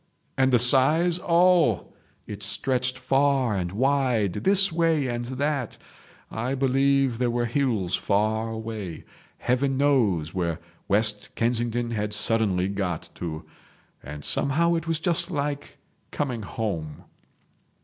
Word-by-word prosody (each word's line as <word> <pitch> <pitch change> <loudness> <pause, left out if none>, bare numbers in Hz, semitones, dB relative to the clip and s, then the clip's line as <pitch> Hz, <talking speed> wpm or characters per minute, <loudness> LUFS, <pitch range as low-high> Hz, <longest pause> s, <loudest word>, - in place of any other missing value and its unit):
And 130 -1 +2
the 125 - +5
size? 150 +8 +3
Oh! 170 - +3 0.3
it 105 -1 -8
stretched 130 +5 -1
far 135 -5 +1
and 90 -2 -2
wide, 125 -4 +1
this 195 - +3
way 165 -3 +1
and 120 -1 -3
that. 135 0 -2 0.5
I 125 +4 -2
believe 135 -1 +2
there 125 -1 +1
were 120 0 0
hills 120 -8 0
far 110 +2 0
away. 110 -6 -6 0.3
Heaven 130 +2 0
knows 110 - +1
where 85 -4 -1 0.3
West 105 0 +1
Kensington 120 0 -1
had 105 -2 -2
suddenly 105 -4 +1
got 95 -4 -3
to. 80 -2 -6 0.6
And 75 +2 -9
somehow 170 +5 +2
it 165 -1 -2
was 165 -1 0
just 170 +1 0
like 145 -3 -4 0.3
coming 130 -6 -3
home. 85 -9 -5
120 Hz, 125 wpm, -25 LUFS, 105-140 Hz, 0.6 s, the